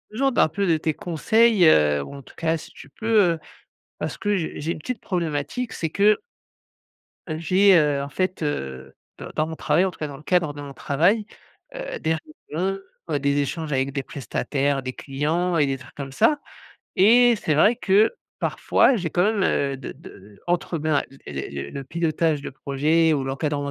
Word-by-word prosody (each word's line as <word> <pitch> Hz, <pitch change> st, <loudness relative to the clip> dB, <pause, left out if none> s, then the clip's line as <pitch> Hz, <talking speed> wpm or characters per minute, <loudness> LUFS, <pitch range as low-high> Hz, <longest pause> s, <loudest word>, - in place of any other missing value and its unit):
besoin 270 Hz, +5 st, +1 dB
d'un 185 Hz, -, +4 dB
peu 200 Hz, +5 st, -1 dB
de 165 Hz, -, +3 dB
tes 155 Hz, -1 st, -1 dB
conseils, 210 Hz, +4 st, +3 dB
heu, 75 Hz, -, +5 dB
ou 140 Hz, -, -9 dB
en 140 Hz, -, -9 dB
tout -, -, -17 dB
cas, 165 Hz, 0 st, 0 dB
si -, -, -10 dB
tu 135 Hz, -, -14 dB
peux, 220 Hz, +6 st, +2 dB
heu, 165 Hz, -, -7 dB, 0.6 s
parce -, -, -4 dB
que 205 Hz, -1 st, 0 dB
j'ai 160 Hz, -, -4 dB
j'ai 165 Hz, +3 st, -1 dB
une -, -, -9 dB
petite 235 Hz, +7 st, -5 dB
problématique, 170 Hz, -, -2 dB
c'est 160 Hz, -, -2 dB
que 205 Hz, +5 st, +3 dB, 1.1 s
j'ai, 185 Hz, +5 st, +4 dB
heu, 145 Hz, -3 st, +2 dB
en 140 Hz, -, -5 dB
fait, 185 Hz, +4 st, -2 dB
heu, 65 Hz, -, -4 dB, 0.3 s
d -, -, -7 dB
dans 155 Hz, 0 st, +1 dB
mon 160 Hz, -, -5 dB
travail, 155 Hz, +4 st, +2 dB
en 190 Hz, -, -1 dB
tout -, -, -18 dB
cas 155 Hz, -, -2 dB
dans 140 Hz, -1 st, -8 dB
le 150 Hz, -, -15 dB
cadre 170 Hz, -4 st, +1 dB
de 145 Hz, -, -8 dB
mon 140 Hz, -1 st, -8 dB
travail, 175 Hz, +12 st, +1 dB, 0.5 s
heu, -, -, -5 dB
des 160 Hz, 0 st, 0 dB, 0.4 s
réunions, 190 Hz, +5 st, -1 dB, 0.4 s
des 140 Hz, +1 st, +1 dB
échanges 155 Hz, +2 st, -3 dB
avec 135 Hz, +1 st, 0 dB
des 140 Hz, -1 st, -2 dB
prestataires, 140 Hz, +1 st, -2 dB
des 130 Hz, -, -4 dB
clients 160 Hz, +7 st, -1 dB
et 150 Hz, -, +4 dB
des 135 Hz, -, -1 dB
trucs 130 Hz, -1 st, -15 dB
comme 140 Hz, -2 st, -6 dB
ça 290 Hz, -, +3 dB, 0.6 s
et 235 Hz, +5 st, +6 dB
c'est 160 Hz, -, 0 dB
vrai 210 Hz, +11 st, +4 dB
que, 210 Hz, -1 st, +4 dB, 0.3 s
parfois, 260 Hz, -, +3 dB
j'ai 175 Hz, -5 st, -2 dB
quand 175 Hz, -, +1 dB
même, 210 Hz, -1 st, +2 dB
heu, 140 Hz, -5 st, +1 dB
de 130 Hz, -, -7 dB
de 105 Hz, -8 st, -15 dB
entre 175 Hz, -1 st, -1 dB
ben, 155 Hz, -2 st, +1 dB
l 135 Hz, -, -16 dB
les 70 Hz, -2 st, -5 dB
les 70 Hz, 0 st, -6 dB
le 140 Hz, -, -6 dB
pilotage 160 Hz, 0 st, 0 dB
de -, -, -5 dB
projets 150 Hz, +5 st, +1 dB
ou 140 Hz, -3 st, 0 dB
l'encadrement 145 Hz, +2 st, -2 dB
155 Hz, 200 wpm, -23 LUFS, 140-185 Hz, 1.1 s, et